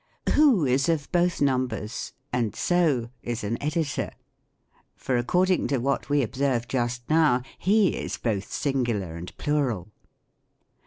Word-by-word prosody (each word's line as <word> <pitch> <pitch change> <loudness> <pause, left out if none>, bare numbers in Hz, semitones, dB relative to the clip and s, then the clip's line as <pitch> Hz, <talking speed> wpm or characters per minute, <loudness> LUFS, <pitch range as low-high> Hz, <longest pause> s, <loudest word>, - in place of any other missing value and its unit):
Who 270 - +5
is 130 +5 +2
of 155 -4 -1
both 175 -2 +1
numbers; 125 -5 -1 0.2
and 115 -4 0
so 150 -10 +1
is 120 -1 -4
an 110 +3 -2
Editor; 150 0 -1 0.9
for, 130 - -2
according 180 +10 +2
to 135 +2 +1
what 135 +3 -1
we 145 -1 +3
observed 125 0 -1
just 120 -1 -1
now, 155 -6 +3 0.2
he 200 0 +4
is - - -4
both 100 -4 -2
singular 120 - -1
and 85 +1 -9
plural. 130 - -1
130 Hz, 130 wpm, -26 LUFS, 120-155 Hz, 0.9 s, Who